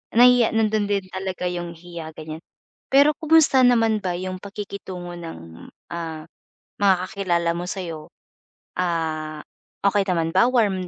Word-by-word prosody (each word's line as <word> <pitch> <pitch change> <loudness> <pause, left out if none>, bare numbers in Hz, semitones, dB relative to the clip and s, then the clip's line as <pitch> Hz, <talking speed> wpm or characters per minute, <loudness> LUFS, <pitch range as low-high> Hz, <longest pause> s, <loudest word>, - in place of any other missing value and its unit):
nahiya 245 -1 +6
nandon 215 -2 +2
din 200 -1 0
talaga 190 -1 -4
yung 175 -1 -5
hiya 165 -2 -9
gan'yan. 155 0 -7 0.5
Pero 280 +3 +6
kumusta 315 -4 +5
naman 225 -3 +4
ba 180 -3 -2
yung 185 +1 -4
pakikitungo 190 -3 -7
ng, 85 - -10 0.2
ah, 165 -2 -5 0.6
mga 200 -2 +5
kakilala 175 -5 0
mo 175 - -4
sa'yo? 170 -5 -5 0.7
Ah, 160 -3 -2 0.4
okey 200 0 +3
naman 165 -3 0
ba, 235 - +6
warm 200 -7 +1
185 Hz, 130 wpm, -23 LUFS, 170-210 Hz, 0.7 s, nahiya